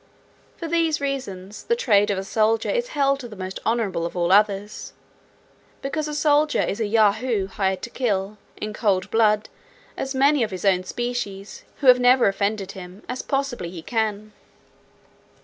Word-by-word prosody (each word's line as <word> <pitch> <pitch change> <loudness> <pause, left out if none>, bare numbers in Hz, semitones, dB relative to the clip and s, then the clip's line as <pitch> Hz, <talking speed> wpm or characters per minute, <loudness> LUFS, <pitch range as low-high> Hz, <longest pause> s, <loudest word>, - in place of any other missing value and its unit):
For 335 - -5
these 330 -1 +1
reasons, 215 -9 -5
the 470 - +2
trade 210 - +3
of 200 - 0
a 190 - -3
soldier 220 +2 +1
is 485 0 0
held 275 0 +2
the 235 -4 -9
most 185 -1 -6
honourable 210 -7 0
of 170 +2 -4
all 175 0 +1
others; 205 0 +1 0.9
because 305 +3 -2
a 300 - -4
soldier 300 0 +3
is 200 - -3
a 220 - 0
Yahoo 215 0 +2
hired 190 -1 -2
to 235 - -6
kill, 210 -4 -2 0.2
in 215 0 -5
cold 200 -4 0
blood, 215 -1 +3 0.5
as 270 0 -4
many 280 +1 +4
of 225 - +1
his 185 -1 -6
own 185 -2 +3
species, 210 -3 -5 0.2
who - - -3
have 250 0 +8
never 250 -1 +5
offended 200 0 -1
him, 185 0 -11
as 250 +1 -4
possibly 275 -10 -2
he 170 -2 -9
can. 215 -1 -2
215 Hz, 165 wpm, -23 LUFS, 195-260 Hz, 0.9 s, have